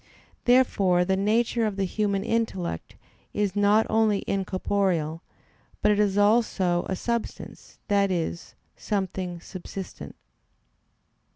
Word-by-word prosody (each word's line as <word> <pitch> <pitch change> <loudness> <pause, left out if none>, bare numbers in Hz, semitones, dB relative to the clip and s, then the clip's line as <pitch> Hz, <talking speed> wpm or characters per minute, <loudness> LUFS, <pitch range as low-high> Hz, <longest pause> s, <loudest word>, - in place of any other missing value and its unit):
Therefore 200 -8 +4
the 190 +1 +1
nature 225 +4 +1
of 205 - -3
the 195 - -1
human 200 +1 -1
intellect 220 - -2 0.4
is 205 -2 0
not 205 +2 +4
only 220 -2 +2
incorporeal, 185 -4 -1 0.6
but 210 - +5
it 205 - +2
is 205 -1 +2
also 205 -5 +2
a 190 - 0
substance, 235 +4 -5
that 200 -1 +3
is, 170 -1 -3 0.2
something 190 -3 -3
subsistent. 185 - -8
200 Hz, 110 wpm, -26 LUFS, 185-210 Hz, 0.6 s, but